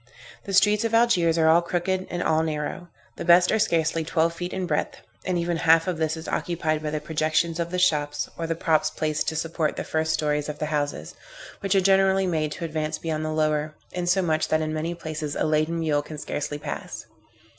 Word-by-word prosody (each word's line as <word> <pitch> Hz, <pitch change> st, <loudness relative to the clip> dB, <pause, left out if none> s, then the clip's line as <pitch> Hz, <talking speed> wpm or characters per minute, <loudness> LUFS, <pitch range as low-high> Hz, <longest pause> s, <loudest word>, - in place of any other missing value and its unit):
The 195 Hz, -, -5 dB
streets 210 Hz, +3 st, +4 dB
of 230 Hz, 0 st, 0 dB
Algiers 180 Hz, -9 st, +3 dB
are 160 Hz, -1 st, +3 dB
all 165 Hz, +2 st, +6 dB
crooked, 185 Hz, +2 st, -2 dB
and 175 Hz, -, -2 dB
all 160 Hz, 0 st, +2 dB
narrow. 160 Hz, +3 st, -3 dB, 0.3 s
The -, -, -4 dB
best 175 Hz, +1 st, +5 dB
are 220 Hz, -, +2 dB
scarcely 165 Hz, -4 st, +1 dB
twelve 165 Hz, +1 st, +1 dB
feet 175 Hz, +1 st, -5 dB
in 190 Hz, -1 st, -2 dB
breadth, -, -, -1 dB, 0.3 s
and 180 Hz, -1 st, +1 dB
even 170 Hz, 0 st, -1 dB
half 165 Hz, 0 st, +4 dB
of 175 Hz, -3 st, -2 dB
this 160 Hz, 0 st, 0 dB
is 160 Hz, -, -8 dB
occupied 160 Hz, -3 st, -1 dB
by 155 Hz, -, -3 dB
the 155 Hz, 0 st, -2 dB
projections 160 Hz, +2 st, 0 dB
of 170 Hz, 0 st, -1 dB
the 180 Hz, -, -3 dB
shops, 145 Hz, -5 st, +1 dB
or 165 Hz, -, -4 dB
the 165 Hz, -, -1 dB
props 160 Hz, -1 st, +2 dB
placed 155 Hz, 0 st, -2 dB
to 160 Hz, -, -1 dB
support 160 Hz, 0 st, -1 dB
the -, -, -3 dB
first 160 Hz, 0 st, -1 dB
stories 150 Hz, -1 st, 0 dB
of 150 Hz, -, -5 dB
the 155 Hz, -, -2 dB
houses, 145 Hz, -1 st, -2 dB, 0.5 s
which 195 Hz, 0 st, 0 dB
are 195 Hz, -, +5 dB
generally 195 Hz, 0 st, +3 dB
made 155 Hz, -4 st, -1 dB
to 170 Hz, -, -5 dB
advance 155 Hz, -1 st, -2 dB
beyond 155 Hz, -1 st, -3 dB
the 155 Hz, -, -2 dB
lower, 155 Hz, -1 st, 0 dB, 0.2 s
insomuch 175 Hz, -3 st, +1 dB
that 155 Hz, -, +2 dB
in 155 Hz, 0 st, -2 dB
many 160 Hz, +2 st, -2 dB
places 155 Hz, -3 st, -5 dB
a -, -, 0 dB
laden 155 Hz, +2 st, +1 dB
mule 155 Hz, -3 st, +1 dB
can 150 Hz, +1 st, -9 dB
scarcely 145 Hz, 0 st, -4 dB
pass. 145 Hz, 0 st, -6 dB
160 Hz, 215 wpm, -25 LUFS, 155-175 Hz, 0.5 s, all